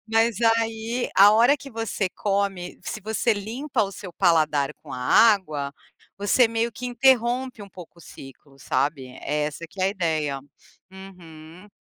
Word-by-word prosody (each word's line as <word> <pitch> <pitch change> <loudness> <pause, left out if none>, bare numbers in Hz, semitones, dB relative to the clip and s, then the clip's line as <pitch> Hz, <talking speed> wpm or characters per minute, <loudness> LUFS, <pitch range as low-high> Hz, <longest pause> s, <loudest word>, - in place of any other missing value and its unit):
Mas 225 -1 +1
aí, 225 +1 0
a 200 +2 +8
hora 240 +7 +5
que 275 +1 -11
você 225 -3 -2
come, 195 -3 -2
se 215 - -5
você 220 +2 0
limpa 235 +5 -2
o 195 - -7
seu 185 -3 -9
paladar 155 -5 +2
com 150 - -17
a 125 - -5
água, 150 - +3 0.5
você 215 +4 +3
meio 230 +1 -1
que 250 - -9
interrompe 245 -1 +1
um 200 - -11
pouco 175 -1 -13
o - - -15
ciclo, 135 0 -14
sabe? 135 +1 -1 0.2
É 150 0 -1
essa 150 +2 -5
que 195 - -10
é 185 - +2
a - - +2
ideia. 155 -7 -2 0.5
Uhum. 180 -2 -13
200 Hz, 165 wpm, -24 LUFS, 160-225 Hz, 0.5 s, a